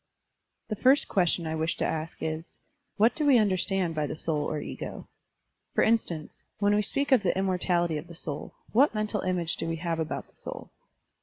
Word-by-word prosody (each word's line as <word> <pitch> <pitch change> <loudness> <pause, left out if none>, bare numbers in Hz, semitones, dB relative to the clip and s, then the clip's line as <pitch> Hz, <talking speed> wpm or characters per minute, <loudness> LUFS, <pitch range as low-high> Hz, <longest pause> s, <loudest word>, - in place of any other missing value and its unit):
The 215 - -1
first 265 +7 +4
question 175 -2 +2
I 160 - -2
wish 160 +1 -1
to - - 0
ask 160 +1 -3
is: 160 +1 -4 0.4
"What 225 +3 +5
do 310 - -2
we 285 -3 +6
tmderstand 190 -4 +2
by 150 -2 -1
the - - -4
soul 155 -2 -1
or 155 - -2
ego?*' - - -6 0.7
For - - +4
instance, 180 -9 0 0.2
when 205 -1 +3
we 210 - +3
speak 280 +7 0
of 260 -4 +6
the 185 -2 +1
immortality 175 -4 +1
of 160 - -10
the 170 - -11
soul, 150 -3 -6 0.2
what 255 +1 +4
mental 215 -1 -1
image 180 -3 -1
do - - -3
we 165 - -1
have 165 0 -2
about 160 -1 -3
the - - -29
soul? - - -8
180 Hz, 200 wpm, -28 LUFS, 160-210 Hz, 0.7 s, we